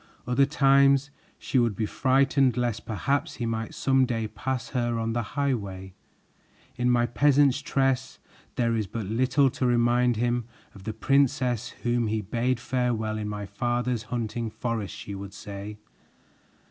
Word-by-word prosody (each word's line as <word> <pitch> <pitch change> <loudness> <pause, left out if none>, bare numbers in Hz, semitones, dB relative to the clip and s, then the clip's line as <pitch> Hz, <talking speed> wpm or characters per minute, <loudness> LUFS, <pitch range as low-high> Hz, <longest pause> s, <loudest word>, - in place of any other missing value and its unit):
Other 125 +3 +3
times 140 0 +4 0.3
she 130 - 0
would 115 -4 +1
be 110 - -1
frightened 135 +2 +2
lest 120 -3 -2
perhaps 140 +6 -1
he 120 - -3
might 115 -1 -3
some 135 -1 +2
day 115 -3 -1
pass 130 +3 -4
her 120 -3 -1
on 115 0 -1
the 120 - 0 0.2
highway. 100 -9 -2 0.8
"In 125 0 +1
my 120 -1 +3
peasant's 145 +2 +3
dress, 135 -2 0 0.4
there 115 -2 +1
is 110 -3 -1
but 110 +1 -5
little 130 +6 +2
to 130 - -2
remind 120 0 +3
him 120 +1 0 0.3
of 100 - -14
the 110 - -3
princess 125 -1 +1
whom 120 -1 +1
he 110 +1 0
bade 120 +5 -1
farewell 120 -4 -1
in 105 -1 -3
my 105 -1 -4
father's 120 +3 -1
hunting 115 -1 -2
forest," 110 -4 -4
she 100 - -7
would 100 0 -8
say. 100 +1 -7
120 Hz, 155 wpm, -26 LUFS, 110-130 Hz, 0.8 s, times